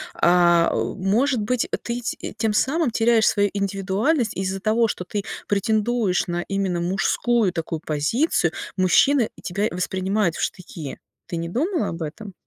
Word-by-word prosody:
А, 175 -1 +4
может 220 +7 0
быть, 235 +3 0 0.2
ты 240 +1 -3
т 230 - -5
тем 220 -1 0
самым 290 +7 +1
теряешь 225 0 +3
свою 205 -1 +3
индивидуальность 200 - 0
из-за 190 0 -2
того, 225 +3 +2
что 180 - -4
ты 205 -1 -3 0.2
претендуешь 215 -1 +1
на 175 0 -2
именно 195 -3 -1
мужскую 195 +4 +1
такую 165 -1 -3
позицию, 160 - +1 0.3
мужчины 225 +7 +4
и - - -15
тебя 200 +4 -1
воспринимают 185 0 -1
в - - -4
штыки. 165 -6 -5 0.3
Ты 170 - -4
не 165 0 -3
думала 320 - 0
об 165 - -6
этом? 190 +6 -6
200 Hz, 150 wpm, -23 LUFS, 180-230 Hz, 0.3 s, А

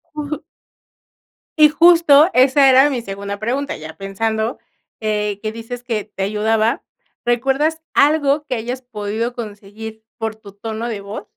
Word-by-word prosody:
Uh. 300 0 -3 1.2
Y 305 -1 +7
justo 330 -1 +6
esa 265 +2 +5
era 265 +2 +6
mi 255 -4 -2
segunda 200 -1 -6
pregunta, 255 +7 -2
ya 155 +1 -9
pensando, 220 +4 -2 0.4
eh, 210 -2 -1
que 215 0 -3
dices 230 +2 -7
que 225 -4 -2
te 205 -2 -5
ayudaba, 215 +2 +1 0.4
¿recuerdas 270 +7 +1
algo 295 0 +3
que 260 - -2
hayas 245 +3 -4
podido 225 0 -4
conseguir 220 -1 -8
por 225 -2 -3
tu 205 -2 -14
tono 220 +3 -5
de 215 -4 -4
voz? 200 +2 -7
225 Hz, 140 wpm, -19 LUFS, 210-270 Hz, 1.2 s, Y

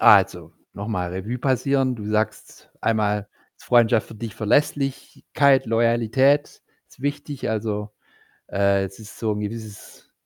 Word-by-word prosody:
Also, - - +5 0.2
nochmal 100 -4 -3
Revue 105 +7 -4
passieren. 135 0 +1
Du 105 - -7
sagst 110 0 -3
einmal, 105 -2 0 0.3
Freundschaft 115 -2 +3
für 115 - -10
dich, 110 -2 -7
Verlässlichkeit, 135 +2 +1
Loyalität 115 +5 +2 0.3
ist - - -19
wichtig. 145 -2 -3
Also, 105 -1 -2 0.6
äh, 100 0 +2
es 95 +2 -11
ist 105 -1 -12
so 110 -2 0
'n 105 - -4
gewisses, 105 0 -8
110 Hz, 125 wpm, -23 LUFS, 105-130 Hz, 0.6 s, Also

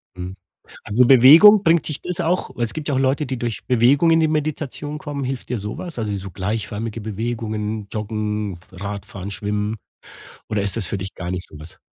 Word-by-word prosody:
Mhm. 90 +1 -6 0.5
Also, 120 +4 +3
Bewegung 160 - +9
bringt 165 -2 +3
dich 150 - -3
das 180 0 -4
auch 170 +2 0
weil 120 - -1
es 110 - -4
gibt 155 -1 -5
ja 145 - +1
auch 130 - +1
Leute, 135 +2 +1
die 130 -1 -4
durch 120 -2 -4
Bewegung 130 +6 +4
in 165 0 +5
die 160 - +3
Meditation 150 -1 -3
kommen, 145 -3 -5
hilft 130 -1 -4
dir 125 - -2
so 105 +8 -5
was? 175 -7 -7
Also, 105 -2 -2
so 95 0 -7
gleichförmige 105 +4 -4
Bewegungen, 110 -1 -3
Joggen, 105 -2 -3 0.2
Radfahren, 100 0 -6
Schwimmen 105 +1 -2 0.7
oder 105 -2 0
ist 100 -1 -1
das 100 -6 0
für - - -2
dich 95 0 -6
gar 90 0 -5
nicht 90 -1 -4
so 75 - -13
was? 80 +2 -12
115 Hz, 200 wpm, -21 LUFS, 105-145 Hz, 0.7 s, Bewegung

